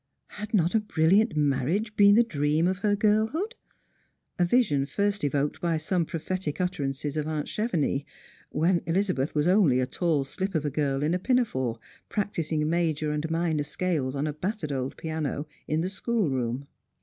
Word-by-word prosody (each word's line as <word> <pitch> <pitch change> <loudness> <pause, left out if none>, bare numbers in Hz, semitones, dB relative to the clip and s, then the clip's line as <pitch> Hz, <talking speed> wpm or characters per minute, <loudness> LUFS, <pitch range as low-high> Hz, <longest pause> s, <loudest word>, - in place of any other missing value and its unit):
Had 210 +1 -7
not 175 -3 +2
a 220 - +4
brilliant 205 +2 +2
marriage 150 - 0
been 205 -1 +7
the 235 - +6
dream 155 -5 +1
of 185 0 -1
her 205 +1 +2
girlhood? 220 - +1 0.9
a - - +5
vision 175 - +2
first 200 +2 -1
evoked 145 0 0
by 170 -2 +1
some 165 +1 0
prophetic 165 -1 -3
iitterances 145 -5 -2
of 155 0 -1
aunt 155 -2 -2
Chevenix, 165 - 0 0.5
when 170 +4 +2
Elizabeth 170 -6 0
was 150 0 +2
only 180 -9 +4
a 130 - +2
tall 155 +1 0
slip 190 +7 -4
of 155 -1 0
a 145 - -1
girl 140 -1 0
in 155 +3 +1
a 180 - +1
pinafore 180 - 0 0.3
practising 160 -7 -1
major 155 -2 0
and 150 +2 -2
minor 165 -2 0
scales 145 -3 -1
on 140 +2 -1
a 150 - -2
battered 175 0 -3
old 130 -1 -3
piano 155 -2 -3 0.2
in 155 +1 0
the 175 - -1
school 205 - 0
room. 125 +1 -2
160 Hz, 175 wpm, -27 LUFS, 145-200 Hz, 0.9 s, been